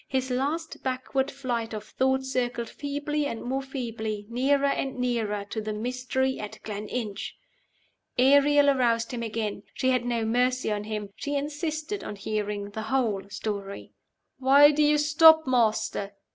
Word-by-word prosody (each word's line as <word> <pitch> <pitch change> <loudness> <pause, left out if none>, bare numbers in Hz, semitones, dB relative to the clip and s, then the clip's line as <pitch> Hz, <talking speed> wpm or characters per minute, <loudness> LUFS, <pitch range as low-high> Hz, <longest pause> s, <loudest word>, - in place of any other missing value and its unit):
His 260 -1 -1
last 295 +6 -2
backward 265 +1 -1
flight 240 -5 -3
of 210 - -5
thought 265 +4 0
circled 245 -3 -2
feebly 290 +1 -2
and 230 - -5
more 265 +2 -1
feebly 225 -6 -4
nearer 275 +4 +2
and 275 -1 -1
nearer 225 -5 -1
to 220 - -2
the 215 0 -3
mystery 255 +3 -1
at 210 - -6
Gleninch! 210 0 -4 0.8
Ariel 285 +2 +5
aroused 235 -3 +1
him 245 -2 -4
again. 215 -3 -3
She 260 - +1
had 255 -2 +1
no 235 -2 -1
mercy 250 +1 +1
on 210 0 -2
him; 210 -2 -4
she 285 0 -3
insisted 310 +6 -3
on 210 - -6
hearing 205 0 -3
the 220 - -5
whole 220 -7 0
story. 200 -1 -5 0.5
"Why 280 +3 +7
do 300 +1 +1
you 300 0 +4
stop, 315 +2 +6
Master? 220 -5 +1
250 Hz, 150 wpm, -27 LUFS, 220-275 Hz, 0.8 s, Why